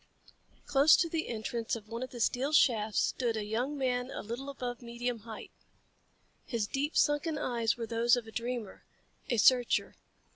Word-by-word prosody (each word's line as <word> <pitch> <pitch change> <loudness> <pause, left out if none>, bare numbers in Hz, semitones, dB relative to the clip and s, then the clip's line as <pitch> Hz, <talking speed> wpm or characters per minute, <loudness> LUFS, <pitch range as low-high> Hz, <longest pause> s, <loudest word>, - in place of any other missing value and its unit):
Close 280 +2 +6
to 335 - +2
the 325 -1 -2
entrance 230 0 -3
of 220 -2 -9
one 230 +2 -5
of 255 - -4
the 245 - -9
steel 255 +5 +1
shafts 225 -8 +3
stood 235 -3 0
a 210 - -3
young 245 +7 -2
man 250 -1 -1
a - - -6
little 240 +6 -5
above 250 -3 -5
medium 235 0 -3
height. 220 +1 -9 0.9
His 230 -5 -2
deep 280 +7 -2
sunken 295 +2 +2
eyes 235 -5 0
were 230 - -3
those 230 +1 +3
of 245 -2 -4
a 220 - -11
dreamer, 235 -3 -4 0.5
a 240 - +1
searcher. 245 +3 +4
240 Hz, 175 wpm, -31 LUFS, 230-265 Hz, 0.9 s, Close